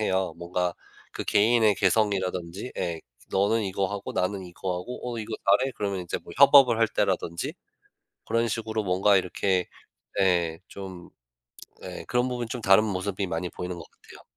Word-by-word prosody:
해요. 95 -4 0
뭔가 90 0 -1 0.4
그 - - -5
개인의 110 0 +4
개성이라든지 95 0 0
예. 85 -3 -2 0.3
너는 105 +3 +2
이거 95 0 -1
하고 100 +1 -5
나는 95 +1 -1
이거 90 +1 -4
하고 125 +8 -7 0.2
어 - - -4
이거 110 0 -4 0.2
잘해? 130 0 -1
그러면 100 -2 -2
이제 90 -1 -4
뭐 - - -10
협업을 135 -4 +7
할 115 -1 +3
때라든지 85 -4 -1 0.7
그런 115 +1 +1
식으로 110 0 -2
뭔가 95 +2 +3
이렇게 90 0 0 0.5
예 85 -4 +2
좀 95 -3 -9 0.7
예 90 -1 -7
그런 125 +1 +1
부분이 120 -2 -3
좀 120 +1 -5
다른 95 +1 +6
모습이 100 0 -2
많이 90 +1 -3
보이는 90 0 -5
것 85 - -8
같아요. - - -16
95 Hz, 330 characters per minute, -26 LUFS, 90-110 Hz, 0.7 s, 협업을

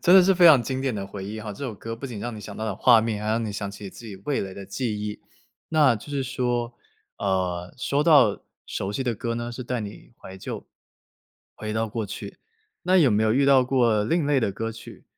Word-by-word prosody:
真 180 - +6
的 190 - +9
是 190 +1 +4
非 180 - +4
常 155 -7 +9
经 130 +3 -3
典 135 -2 0
的 100 -2 -4
回 100 -1 -7
忆 110 +2 -6
吼， 105 -1 -6
这 140 - -7
首 125 - -3
歌 115 +3 -6
不 115 +4 -10
仅 115 -5 -7
让 120 +1 -4
你 105 - -8
想 100 0 -9
到 110 - -4
了 105 -3 -2
画 120 +2 +6
面， 110 -2 -2
还 105 - -2
让 115 +1 0
你 105 - -3
想 100 -1 -4
起 100 +1 -10
你 95 - -6
自 120 - -13
己 100 - -8
味 145 - 0
蕾 95 -1 -5
的 100 0 -9
记 105 +1 -3
忆。 105 0 -5 0.5
那 150 -6 +4
就 110 - -9
是 140 -2 -1
说， 120 -2 -2 0.4
呃， 90 -3 -1
说 140 +3 +1
到 140 -10 +5 0.2
熟 95 - -3
悉 135 +4 -2
的 120 - 0
歌 115 +2 -3
呢， 120 0 -4
是 125 - -6
带 125 0 -2
你 105 +2 -9
怀 95 - -10
旧， 95 - -7 0.9
回 110 0 -5
到 110 0 -1
过 110 0 -3
去。 - - -8 0.4
那 185 +1 +3
有 155 -7 +6
没 105 +1 +2
有 110 0 +3
遇 135 +2 +3
到 135 -2 +6
过 120 -5 +2
另 165 +4 +1
类 145 -3 +3
的 105 - +1
歌 115 +3 -4
曲， 110 - -12
115 Hz, 275 characters per minute, -25 LUFS, 105-130 Hz, 0.9 s, 的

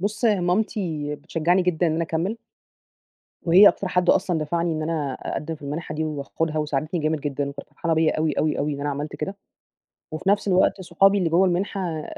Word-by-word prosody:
بُص، 205 +5 -2
هي 210 -4 +3
مامتي 175 -5 -1
بتشجعني 165 +4 0
جدًا 180 -1 +1
إن 160 - +1
أنا 165 +1 0
أكمل. 170 +8 -2 1.1
وهي 185 +5 +8
أكتر 190 - -1
حد 180 -1 +3
أصلًا 175 -4 +1
دفعني 170 +2 -1
إن 155 0 -2
أنا 155 -4 -2
أقدم 150 +5 -5
في 150 - -15
المنحة 150 +2 -5
دي 160 +1 -1
واخدها، 155 +1 -3
وساعدتني 155 +3 -1
جامد 155 0 0
جدًا 140 -1 -2
وكانت 140 0 -9
فرحانة 165 -2 -1
بيّا 160 0 +2
أوي، 155 -1 +1
أوي، 155 +1 0
أوي، 145 +1 -1
إن 140 - -6
أنا 145 +1 -1
عملت 145 +2 -5
كده، 195 +6 -4 0.8
وفي 155 +5 -2
نفس 205 +1 +2
الوقت 190 0 +3
صحابي 195 +3 +3
اللي 180 -4 +1
جوا 175 +4 +4
المنحة 180 -3 -2
165 Hz, 195 wpm, -23 LUFS, 150-180 Hz, 1.1 s, وهي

